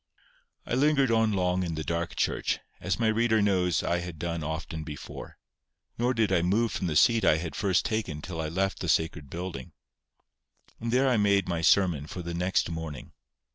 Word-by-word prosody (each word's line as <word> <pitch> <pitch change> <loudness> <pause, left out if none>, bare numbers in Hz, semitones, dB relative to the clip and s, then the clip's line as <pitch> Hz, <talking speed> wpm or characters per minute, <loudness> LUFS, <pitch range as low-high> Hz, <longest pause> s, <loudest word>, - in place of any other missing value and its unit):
I - - -4
lingered 135 -1 +3
on 115 -1 +3
long 90 -2 +1
in 85 -3 -2
the 80 - -3
dark 85 +1 -2
church, - - 0 0.2
as 95 +2 -2
my 115 - +1
reader 110 0 +3
knows 90 -5 +2
I 85 - 0
had 85 -2 -7
done 85 0 -3
often 80 +1 -4
before. 75 -2 -9 0.6
Nor 125 +2 +1
did 110 -3 +1
I 90 -3 +3
move 105 +7 +1
from 90 - -2
the 80 - -2
seat 115 +2 +4
I 80 - +5
had 80 -1 -5
first 95 0 +1
taken 110 -10 -2
till 80 +1 -5
I 80 - -3
left 95 +4 -1
the 90 - -3
sacred 80 -2 0
building. 85 -6 -6 1.1
And 115 0 -3
there 130 +2 +3
I 125 -3 +3
made 100 -2 +3
my 85 -2 -1
sermon 85 -4 +3
for 90 +2 -6
the 85 0 -5
next 90 +2 +1
morning. 80 -4 -6
90 Hz, 195 wpm, -28 LUFS, 80-110 Hz, 1.1 s, I